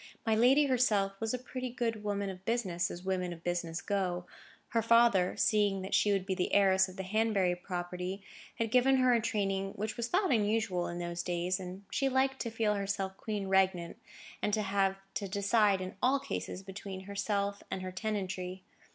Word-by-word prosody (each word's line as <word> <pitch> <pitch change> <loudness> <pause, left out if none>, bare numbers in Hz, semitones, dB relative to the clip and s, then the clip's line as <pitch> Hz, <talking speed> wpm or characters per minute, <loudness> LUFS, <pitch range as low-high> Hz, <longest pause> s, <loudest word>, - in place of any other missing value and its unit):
My 225 - +2
lady 255 +6 +5
herself 225 -7 +2
was 225 -1 -1
a 250 - -1
pretty 255 0 -5
good 230 -3 -2
woman 200 -1 -1
of 185 0 -11
business, 190 -6 0
as 175 - -7
women 185 -2 -1
of 170 -1 -9
business 175 -1 -2
go. 180 -3 -1 0.4
Her 230 - +1
father, 230 -5 +4
seeing 205 -3 +2
that 190 - -6
she 210 - +4
would 195 -2 +1
be 190 - -1
the 180 -1 -1
heiress 190 -1 +4
of 185 - -12
the 190 - -3
Hanbury 200 -2 +1
property, 180 +1 -5 0.3
had 225 -1 -2
given 260 +2 +5
her 255 -1 +4
a 235 - +3
training 195 -3 -1
which 215 +2 -4
was 235 -1 -1
thought 370 +3 +1
unusual 210 -5 +1
in 175 - -5
those 175 0 -3
days, 180 +2 -1
and 185 +1 -7
she 275 - +1
liked 265 0 +1
to 235 - -2
feel 220 -2 +1
herself 195 -1 -2
queen 210 -1 -4
regnant, 190 -3 +2 0.4
and 210 - +1
to 215 - -1
have 195 -1 +1 0.2
to 200 - -3
decide 200 0 +2
in 185 0 -5
all 270 +2 +3
cases 195 -7 -5
between 195 0 -7
herself 200 0 -2
and 185 - -4
her 185 - -4
tenantry. 185 -2 -3
200 Hz, 195 wpm, -32 LUFS, 185-225 Hz, 0.4 s, lady